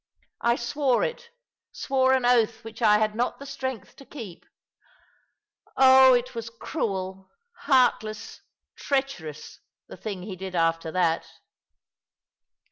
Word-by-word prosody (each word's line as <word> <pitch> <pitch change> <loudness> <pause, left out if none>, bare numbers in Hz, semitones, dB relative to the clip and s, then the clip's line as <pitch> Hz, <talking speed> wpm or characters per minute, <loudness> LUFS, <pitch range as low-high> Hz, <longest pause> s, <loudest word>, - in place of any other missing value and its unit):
I 235 0 +3
swore 255 +1 0
it— 485 -1 -4 0.4
swore 265 -1 +1
an 260 -2 +1
oath 235 -2 +2
which 225 +1 -10
I 210 -2 +5
had 215 0 0
not 240 +3 -1
the 280 - -10
strength 260 -7 -6
to - - -13
keep. 225 - -10 1.3
Oh, 260 -1 +7
it 245 +1 -2
was 230 -1 -6
cruel, 195 -6 -4 0.3
heartless, 220 -5 0 0.3
treacherous 265 - -4
— - - -68
the - - -10
thing 200 -4 -6
he 195 -1 -6
did 190 0 -7
after 165 -1 0
that. 170 -2 0
230 Hz, 125 wpm, -25 LUFS, 190-260 Hz, 1.3 s, Oh